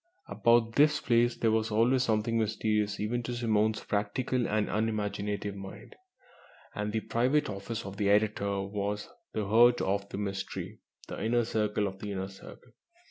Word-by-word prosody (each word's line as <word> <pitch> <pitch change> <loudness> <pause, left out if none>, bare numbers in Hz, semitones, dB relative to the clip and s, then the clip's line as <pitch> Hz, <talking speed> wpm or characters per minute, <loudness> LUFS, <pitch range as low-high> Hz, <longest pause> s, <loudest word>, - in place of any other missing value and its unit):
About 115 -1 +3
this 150 +1 +5
place 120 0 +2
there 115 - +2
was 110 0 +1
always 115 +4 +3
something 115 -1 +1
mysterious 105 -1 0
even 115 +4 -1
to 120 +1 -4
Simone's 110 -2 +1
practical 115 +4 -1
and 105 0 0
unimaginative 105 -2 -2
mind, 95 -1 -10 0.8
and 105 0 -3
the 110 +1 -1
private 130 +6 +1
office 105 +3 -5
of 100 0 -7
the 100 -1 +1
editor 100 -1 +1
was 100 +1 -3 0.2
the 110 - -1
heart 120 +4 +5
of 100 +1 -1
the - - -6
mystery 100 -1 -4 0.3
the - - -5
inner 120 +1 +2
circle 105 -2 0
of 95 -1 -5
the 105 0 -5
Inner 95 0 -4
Circle. 95 - -14
105 Hz, 160 wpm, -30 LUFS, 100-115 Hz, 0.8 s, this